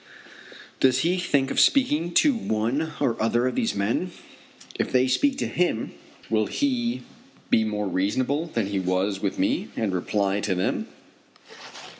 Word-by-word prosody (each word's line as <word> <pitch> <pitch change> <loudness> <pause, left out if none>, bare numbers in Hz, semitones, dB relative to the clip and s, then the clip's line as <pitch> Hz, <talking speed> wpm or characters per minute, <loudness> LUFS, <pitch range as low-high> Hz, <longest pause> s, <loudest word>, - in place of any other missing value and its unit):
Does 130 0 +3
he 180 +3 +1
think 140 -6 +1
of - - +1
speaking 175 - +3
to 300 -2 +5
one 140 - -1
or 115 -2 0
other 120 +2 +2
of 130 - 0
these 235 -3 -1
men, 100 +3 +1
and 180 0 -5 0.7
if - - -1
they 130 0 +3
speak 270 - +2
to - - -1
him 175 -10 -1 0.3
will 110 -1 +1
he 240 - -1 0.5
be 110 - +4
more 105 -1 -2
reasonable 130 - 0
than 115 -9 -1
he 100 0 -2
was 95 +2 0
with 100 -2 -2
me, 95 - 0
and 105 -4 -1
reply 100 +2 0
to 100 -2 -1
them? 90 - -1
120 Hz, 160 wpm, -25 LUFS, 100-165 Hz, 0.7 s, to